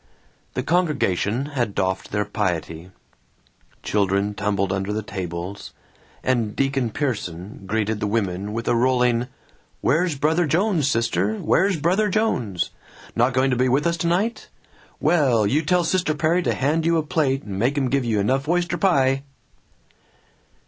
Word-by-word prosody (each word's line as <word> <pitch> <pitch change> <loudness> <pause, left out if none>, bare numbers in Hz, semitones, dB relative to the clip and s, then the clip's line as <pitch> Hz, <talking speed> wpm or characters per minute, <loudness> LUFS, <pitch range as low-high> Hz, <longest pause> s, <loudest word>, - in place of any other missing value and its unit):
The - - -1
congregation 140 - +1
had 120 -7 -1
doffed 95 0 -1
their 105 0 0
piety. 85 -3 -3 0.9
Children 100 0 +1
tumbled 100 -2 -1
under 95 +1 -2
the 110 +1 -2
tables, 90 0 -6 0.5
and 115 -5 0
Deacon 135 -3 0
Pierson 100 - -4
greeted 110 +1 -1
the 105 - -1
women 100 -2 -1
with 115 +2 -4
a - - +3
rolling, 125 0 +2 0.5
"Where's 165 +3 +1
Brother 155 +4 +1
Jones, 175 -2 +1
sister, 110 -5 +1
where's 190 - +2
Brother 190 +7 +2
Jones? 125 - 0 0.4
Not 120 +3 +2
going 130 +1 +2
to - - +2
be 130 +1 +2
with 135 +5 +2
us 170 0 +2
tonight? 175 +8 -1 0.5
Well, 130 -10 +3
you 140 +10 +2
tell 180 +3 +2
Sister 170 -2 0
Perry 165 +3 +2
to - - 0
hand 150 +5 +1
you 165 +1 +2
a 160 - +1
plate, 145 -3 0
and 100 -2 -5
make 130 +6 +1
'em 135 -2 +1
give 140 -1 +2
you 110 -3 0
enough 135 +8 0
oyster 175 0 0
pie!" 135 -8 +3
125 Hz, 150 wpm, -23 LUFS, 105-155 Hz, 0.9 s, a